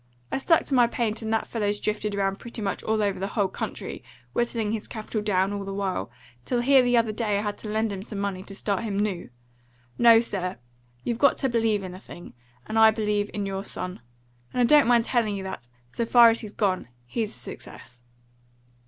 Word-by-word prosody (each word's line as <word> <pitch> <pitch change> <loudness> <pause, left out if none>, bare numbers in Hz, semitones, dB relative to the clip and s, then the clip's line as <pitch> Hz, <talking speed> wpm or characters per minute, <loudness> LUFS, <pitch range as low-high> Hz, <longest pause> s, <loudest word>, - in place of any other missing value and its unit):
I - - 0
stuck 330 +4 +3
to - - -4
my 245 -2 +6
paint, 230 -2 -2
and 220 0 -3
that 225 - +1
fellow's 205 -2 -1
drifted 210 -1 -2
round 195 -1 0
pretty 235 0 -8
much 200 -2 -2
all 220 -1 0
over 200 -2 0
the 195 - -2
whole 200 -2 +3
country, - - -6 0.3
whittling 230 -3 0
his 220 -1 -2
capital 215 -1 -4
down 195 -1 +1
all 200 -1 -3
the 195 0 -5
while, 190 - -2 0.3
till 240 - 0
here 265 +1 +6
the 245 -1 +3
other 230 -2 +2
day 215 -2 0
I 205 - -1
had 205 -1 -2
to 215 - -7
lend 215 0 0
him 190 - -5
some 210 0 -7
money 200 -2 -2
to 195 +1 -9
start 200 -1 -1
him 210 -3 -3
new. 200 -4 -2 0.7
No, 230 -1 +8
sir, 190 - -3 0.5
you've 235 -1 -2
got 280 - +4
to 270 - 0
believe 225 -4 +1
in 185 -1 -6
a 185 - -9
thing. 175 -3 -12 0.3
And 220 +1 0
I 220 0 +9
believe 210 -2 0
in 205 -1 -3
your 195 0 -3
son. 185 -2 -6 0.6
And 250 - +2
I - - +5
don't 290 0 +6
mind 235 -1 +4
telling 225 -5 +1
you 195 - -5
that, 120 -11 -7 0.2
so 235 - -2
far 235 0 +7
as 225 - 0
he's 215 -2 -7
gone, 190 - 0 0.2
he's 215 - -3
a - - -14
success." 125 -1 -10
210 Hz, 220 wpm, -26 LUFS, 195-230 Hz, 0.7 s, I